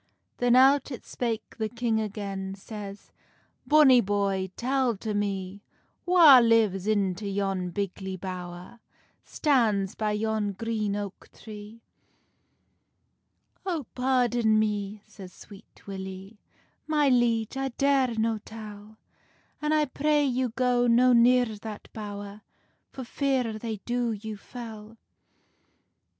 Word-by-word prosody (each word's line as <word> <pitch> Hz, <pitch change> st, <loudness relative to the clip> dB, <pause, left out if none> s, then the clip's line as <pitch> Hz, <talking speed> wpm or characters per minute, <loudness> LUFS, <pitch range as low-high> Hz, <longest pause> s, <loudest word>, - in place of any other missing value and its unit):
Then 245 Hz, 0 st, +3 dB
out 270 Hz, +2 st, +5 dB
it 255 Hz, -, -8 dB
spake 230 Hz, -3 st, -4 dB
the 220 Hz, -1 st, -1 dB
king 235 Hz, -1 st, -1 dB
again, 195 Hz, -2 st, -5 dB
Says, 200 Hz, 0 st, -9 dB, 0.6 s
"Bonny 290 Hz, -5 st, +6 dB
boy, 195 Hz, -2 st, -1 dB
tell 255 Hz, -2 st, 0 dB
to 215 Hz, +2 st, -4 dB
me, 200 Hz, -1 st, -3 dB, 0.5 s
Wha 330 Hz, -7 st, +8 dB
lives 220 Hz, -5 st, +2 dB
into 200 Hz, -2 st, 0 dB
yon 195 Hz, -2 st, -2 dB
bigly 190 Hz, 0 st, -4 dB
bowr, 180 Hz, +3 st, -8 dB, 0.4 s
Stands 220 Hz, -, +1 dB
by 215 Hz, -1 st, -1 dB
yon 215 Hz, -1 st, -1 dB
green 215 Hz, 0 st, -2 dB
oak 205 Hz, -2 st, -7 dB
tree?" 215 Hz, +1 st, -11 dB, 1.8 s
"Oh, 335 Hz, -8 st, -3 dB
pardon 245 Hz, -4 st, +2 dB
me," 210 Hz, -1 st, -1 dB
says 185 Hz, -2 st, -12 dB
Sweet 205 Hz, 0 st, -16 dB
Willie, 190 Hz, +1 st, -8 dB, 0.5 s
"My 300 Hz, -2 st, +2 dB
liege, 240 Hz, -3 st, +2 dB
I 270 Hz, 0 st, -1 dB
dare 265 Hz, -2 st, +1 dB
no 220 Hz, 0 st, 0 dB
tell; 215 Hz, -1 st, -11 dB, 0.6 s
An 300 Hz, 0 st, 0 dB
I 305 Hz, -1 st, +3 dB
pray 295 Hz, +2 st, +1 dB
you 255 Hz, -1 st, 0 dB
go 245 Hz, 0 st, +1 dB
no 245 Hz, +2 st, +5 dB
near 245 Hz, +1 st, +5 dB
that 215 Hz, -1 st, -8 dB
bowr, 205 Hz, -1 st, -7 dB, 0.5 s
For 265 Hz, -, -8 dB
fear 250 Hz, -4 st, -1 dB
they 225 Hz, -1 st, -4 dB
do 240 Hz, -1 st, -1 dB
you 215 Hz, +1 st, -6 dB
fell." 220 Hz, 0 st, -10 dB
220 Hz, 120 wpm, -27 LUFS, 200-245 Hz, 1.8 s, Wha